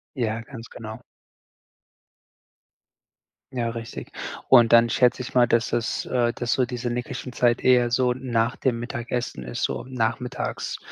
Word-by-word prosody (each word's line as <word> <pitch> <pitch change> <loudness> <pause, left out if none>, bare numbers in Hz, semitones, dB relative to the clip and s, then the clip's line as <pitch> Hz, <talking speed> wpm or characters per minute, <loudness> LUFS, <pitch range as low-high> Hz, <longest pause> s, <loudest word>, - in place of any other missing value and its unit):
Ja, 115 -3 -1
ganz 115 -2 -10
genau. 110 -1 -9 2.5
Ja, 120 -2 -1
richtig. 115 0 -7 0.4
Und 120 -3 +7
dann 115 0 +7
schätze 125 0 +3
ich 125 - -8
mal, 120 -1 +6
dass 115 -1 +1
das 115 -1 -1
äh, 120 -2 +1
dass 120 -1 -2
so 130 - +3
diese 120 0 -4
Nickerchen 125 +1 -4
Zeit 120 0 +2
eher 125 -2 +4
so 125 0 +2
n 130 0 -7
nach 115 +1 +1
dem 120 -3 0
Mittagessen 120 - -4
ist, - - -5
so - - -1
nachmittags, 125 0 -2
120 Hz, 150 wpm, -24 LUFS, 115-125 Hz, 2.5 s, Und